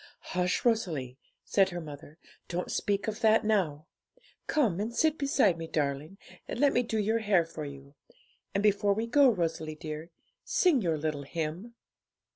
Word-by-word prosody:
'Hush, 180 +3 0
Rosalie!' 155 - 0 0.3
said 195 -2 +3
her 175 -1 -5
mother; 150 -1 -10 0.3
'don't 180 +1 -3
speak 200 0 -1
of 215 +1 -3
that 220 -1 +4
now. 170 -9 +1 0.6
Come 230 - +1
and 225 +3 -3
sit 315 -1 +3
beside 270 - +2
me, 165 - -5
darling, 150 +4 -2 0.3
and - - -5
let 285 0 +4
me 245 - +3
do 225 -2 -2
your 220 +2 +1
hair 200 -6 +3
for 160 -2 -7
you; 140 0 -10 0.6
and 200 - +1
before 205 -1 +3
we 220 +2 -1
go, 270 +3 +5
Rosalie 165 -6 -2
dear, 155 +1 -7 0.3
sing 335 -9 +3
your 165 -5 0
little 150 -1 -2
hymn.' 165 - -5
185 Hz, 165 wpm, -29 LUFS, 155-220 Hz, 0.6 s, go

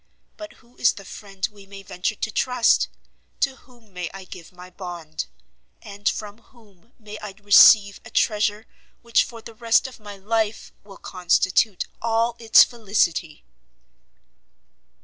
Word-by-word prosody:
But 315 -1 -10
who 245 -1 -25
is 225 - +3
the 200 - -12
friend 195 -1 -5
we 200 -2 -16
may 195 0 -11
venture 185 +3 -3
to 220 - -4
trust? 250 -1 +2 0.5
To 270 -1 +1
whom 240 -7 -22
may 180 -1 -5
I 195 0 -10
give 180 -2 -12
my 180 0 -13
bond? 175 -4 -7 0.5
And 200 0 -3
from 210 0 -6
whom 225 -3 -24
may 215 -2 -10
I 205 -2 -8
receive 200 0 +7
a - - -12
treasure 210 0 0 0.4
which 235 -1 +3
for 230 -1 -11
the 230 - -11
rest 230 +2 +2
of 260 -3 -9
my 205 -1 -10
life 220 +2 -2
will 200 -1 -14
constitute 185 +3 +1 0.2
all 230 +1 0
its 225 -1 +7
felicity?" 195 -8 -1
210 Hz, 150 wpm, -23 LUFS, 195-230 Hz, 0.5 s, receive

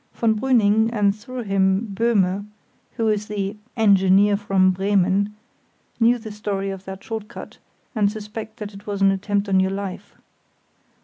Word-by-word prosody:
Von 225 -2 +2
Brüning, 220 -3 +3
and 205 -3 +2
through 245 +3 -7
him 195 +1 +1
Böhme 200 -2 +1 0.5
(who 225 - -1
is 210 -1 0
the 200 -1 -3 0.2
"engineer 200 -1 +4
from 195 -2 +2
Bremen"), 195 +1 +1 0.6
know 235 +1 +4
the 220 -2 -9
story 200 -2 -3
of 195 0 -8
that 190 0 -8
short 220 -2 -5
cut 235 - -11 0.3
and 205 -4 +2
suspect 215 +1 -8
that 210 -1 -7
it 200 +1 -13
was 200 -1 -2
an 195 - +6
attempt 200 +1 -1
on 190 -1 +3
your 190 0 +2
life. 195 -1 -6
205 Hz, 160 wpm, -22 LUFS, 195-220 Hz, 0.6 s, an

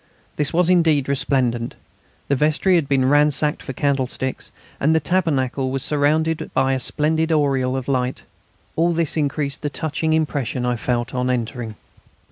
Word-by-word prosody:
This 150 -1 0
was 175 +1 +2
indeed 165 -6 +3
resplendent. 125 -4 0 0.5
The 140 - +2
vestry 155 +7 +2
had 165 -5 +2
been 135 -2 +2
ransacked 150 +1 +2
for - - -6
candlesticks, 130 -1 -2 0.3
and 155 +3 +3
the - - +4
tabernacle 140 -6 0
was 135 0 -2
surrounded 155 +2 +1
by 135 0 +2
a 130 - 0
splendid 160 +5 0
aureole 135 -4 +1
of 130 - -5
light. 130 -2 -1 0.5
All 170 +1 +2
this 165 -2 0
increased 145 -2 -1
the 145 - -2
touching 160 +1 -1
impression 140 -6 -1
I 125 0 +1
felt 120 0 -2
on 125 0 -1
entering. 120 -2 -3
140 Hz, 155 wpm, -21 LUFS, 130-155 Hz, 0.5 s, the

